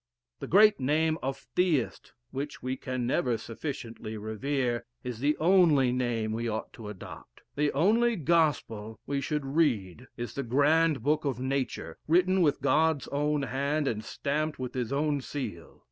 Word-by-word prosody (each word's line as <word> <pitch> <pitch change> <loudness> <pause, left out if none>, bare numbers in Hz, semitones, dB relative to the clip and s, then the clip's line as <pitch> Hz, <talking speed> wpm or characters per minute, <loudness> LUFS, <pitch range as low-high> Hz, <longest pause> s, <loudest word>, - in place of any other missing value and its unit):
'The - - -6
great 210 +1 +6
name 155 +4 +2
of 135 +1 -2 0.2
Theist, 165 -9 0 0.2
which 140 +2 -5
we 130 +1 -1
can 130 -1 -3
never 120 -1 +1
sufficiently 115 -2 -6
revere,' 120 +3 -1 0.2
is 125 -3 -5
the 145 +3 +1
only 160 -7 +4
name 120 -3 -1
we 115 +1 -2
ought 110 0 -4
to 110 -2 -8
adopt. 95 -10 -11
The 145 0 +1
only 225 - +3
gospel 145 - 0
we 140 -1 -1
should 150 -1 -2
read 130 - 0
is 120 0 -5
the 140 - -2
grand 145 +2 +3
book 150 +3 +2
of 135 -5 -2
nature, 130 0 -3
written 180 +3 +4
with 145 -5 +2
God's 155 +1 +2
own 150 0 0
hand, 140 +3 -1
and 110 -4 -2
stamped 150 +6 -2
with 130 -1 -5
his 125 -1 -2
own 145 0 0
seal. 120 - -6
140 Hz, 160 wpm, -29 LUFS, 120-155 Hz, 0.2 s, great